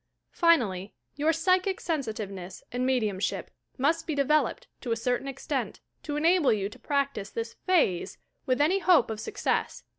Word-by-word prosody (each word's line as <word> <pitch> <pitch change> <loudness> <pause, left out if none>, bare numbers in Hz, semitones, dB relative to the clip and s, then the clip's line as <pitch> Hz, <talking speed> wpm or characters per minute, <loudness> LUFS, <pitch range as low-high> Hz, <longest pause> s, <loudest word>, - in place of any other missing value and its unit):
Finally, 215 - +2 0.2
your 300 +2 +2
psychic 370 +3 +2
sensitiveness 215 - -4
and 250 +1 -1
me 260 -1 +3
diumship 205 -4 -2 0.3
must 300 +5 +1
be 310 - -1
developed, 305 - +1 0.2
to 245 - -4
a - - +3
certain 245 +3 -1
extent, 270 -1 -3 0.2
to 295 - -4
enable 325 0 +4
you 200 -2 0
to - - -14
practice 280 -8 -1
this 230 0 -4
"phase" 245 - +2 0.3
with 255 0 +2
any 335 +7 +3
hope 360 -11 +4
of 215 - -4
success. 425 - -2
275 Hz, 155 wpm, -28 LUFS, 220-325 Hz, 0.3 s, enable